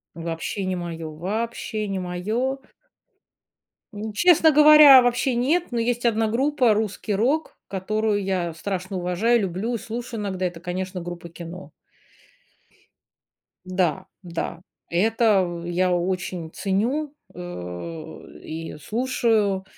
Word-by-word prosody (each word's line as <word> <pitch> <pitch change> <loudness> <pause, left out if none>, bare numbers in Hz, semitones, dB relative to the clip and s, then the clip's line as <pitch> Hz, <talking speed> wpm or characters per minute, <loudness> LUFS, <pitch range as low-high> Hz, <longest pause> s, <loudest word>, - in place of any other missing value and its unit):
Вообще 165 +4 -4
не 185 0 -1
моё, 165 -2 -5
вообще 215 +5 -3
не 195 - -2
моё. 215 +9 -2 1.3
М, 215 +1 -5
честно 320 - +5
говоря, 300 -2 +9
вообще 245 +1 +1
нет, 295 +9 +1
но 235 - -1
есть 240 +1 -1
1 225 -1 +2
группа, 250 -1 +2
русский 210 -1 -2
рок, 270 +10 0
которую 205 +2 -1
я 180 -3 -1
страшно 185 +2 -4
уважаю, 185 +7 +2
люблю 195 +5 -2
и - - -1
слушаю 230 +1 -6
иногда. 190 -2 -3
Это, 175 -2 -6
конечно, 185 +1 -4
группа 175 0 -7
"Кино". 170 +2 -9 1.9
Да 185 -1 -1 0.2
да, 170 -1 -5 0.3
это 190 -2 +2
я 180 +1 +1
очень 175 -2 -2
ценю, 250 +10 -1 0.2
э, 160 - -8
и 160 +1 -6
слушаю, 215 - 0
195 Hz, 115 wpm, -24 LUFS, 175-235 Hz, 1.9 s, говоря